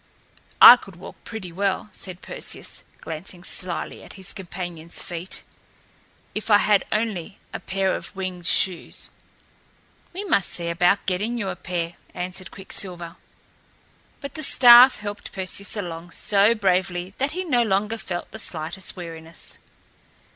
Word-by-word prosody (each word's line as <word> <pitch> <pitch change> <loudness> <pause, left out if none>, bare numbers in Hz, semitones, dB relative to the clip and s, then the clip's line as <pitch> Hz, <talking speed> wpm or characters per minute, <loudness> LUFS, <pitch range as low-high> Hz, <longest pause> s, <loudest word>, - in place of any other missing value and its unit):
"I 245 - +12
could 195 -6 -13
walk 175 - -12
pretty 215 -6 -7
well," 200 +3 -1
said 185 -1 -8
Perseus, - - -4 0.2
glancing 175 +2 -7
slyly 180 -2 -2
at - - -12
his 190 -2 -5
companion's 175 -3 -4
feet, 175 +1 -5 0.9
"if 215 +1 -5
I 205 - +8
had 205 -1 +3
only 210 -4 -2 0.2
a - - -4
pair 190 0 -1
of - - -8
winged 185 -2 -3
shoes." 185 -3 +1 1.0
"We 380 +4 -6
must 310 - +2
see 170 -1 -2
about 180 +4 +2
getting 205 +6 -1
you 200 -4 -2
a - - -4
pair," 175 -1 -4 0.2
answered 180 0 -5
Quicksilver. 180 -3 -4 1.0
But 280 - -7
the 310 - -5
staff 250 -2 +8
helped 205 0 -7
Perseus 195 +2 -1
along 170 -3 -5
so 205 +5 +3
bravely 185 -2 0
that 275 +3 0
he 370 +2 -2
no 255 -9 +2
longer 215 +1 0
felt 175 -4 -5
the 220 - -7
slightest 170 0 -4
weariness. 165 -2 -8
190 Hz, 140 wpm, -24 LUFS, 175-210 Hz, 1.0 s, I